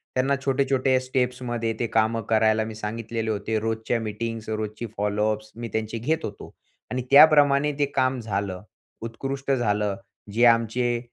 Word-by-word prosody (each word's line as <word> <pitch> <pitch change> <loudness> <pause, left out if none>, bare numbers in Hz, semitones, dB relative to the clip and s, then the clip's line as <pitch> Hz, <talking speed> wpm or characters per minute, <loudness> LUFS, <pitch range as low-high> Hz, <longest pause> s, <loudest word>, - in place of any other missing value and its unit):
त्यांना 135 +2 +2
छोटे-छोटे 135 -1 +2
स्टेप्समध्ये 125 -3 -2
ते 120 - 0
काम 110 +1 +1
करायला 110 0 +3
मी 110 0 -7
सांगितलेले 110 +1 -3
होते. 110 +1 -2
रोजच्या 115 +2 -1
मीटिंग्ज, 115 +1 -5
रोजची 110 +1 -4
फॉलोअप्स 105 +1 -1
मी 115 0 -5
त्यांचे 110 +1 -2
घेत 155 +8 -1
होतो - - -8 0.4
आणि 130 - -1
त्याप्रमाणे 145 -1 +6
ते 145 - +4
काम 130 -1 +1
झालं, 100 -4 -3 0.4
उत्कृष्ट 135 +4 -4
झालं. 105 -5 +1 0.4
जे 120 +2 +4
आमचे 120 +1 +2
115 Hz, 140 wpm, -25 LUFS, 110-130 Hz, 0.4 s, त्याप्रमाणे